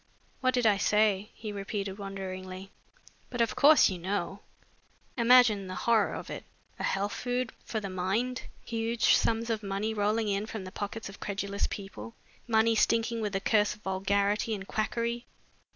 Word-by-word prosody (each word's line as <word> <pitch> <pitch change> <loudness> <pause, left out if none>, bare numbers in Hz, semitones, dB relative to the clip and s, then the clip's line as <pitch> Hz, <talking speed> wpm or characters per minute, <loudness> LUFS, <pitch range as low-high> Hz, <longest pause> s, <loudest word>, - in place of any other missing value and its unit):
"What 255 -1 +2
did 245 -2 +1
I 210 -2 +5
say?" 210 -1 +2
he 215 -2 -6
repeated 200 0 -4
wonderingly. 190 -1 -6 0.6
"But 245 - -5
of 230 -1 +2
course 300 +2 +7
you 185 -2 -3
know! 195 +2 -2 0.8
Imagine 235 -5 +5
the 185 - -5
horror 225 -1 +2
of - - -7
it - - -6 0.4
a - - -3
health 200 +1 0
food 245 -1 -2
for 220 - -3
the 200 - -5
mind! 195 +7 -1 0.2
Huge 230 0 +2
sums 230 +1 +2
of 220 -1 -1
money 200 +2 -2
rolling 215 +1 +1
in 200 +1 -1
from 220 -3 -5
the 185 - -8
pockets 210 +3 -5
of 195 - -11
credulous 200 0 -2
people, 115 - -8 0.3
money 225 0 +4
stinking 230 +1 +2
with 210 -2 -2
the 195 - +1
curse 210 0 +2
of 210 - -22
vulgarity 200 +3 +1
and 195 -1 -8
quackery! 235 +2 -2
210 Hz, 170 wpm, -29 LUFS, 195-230 Hz, 0.8 s, course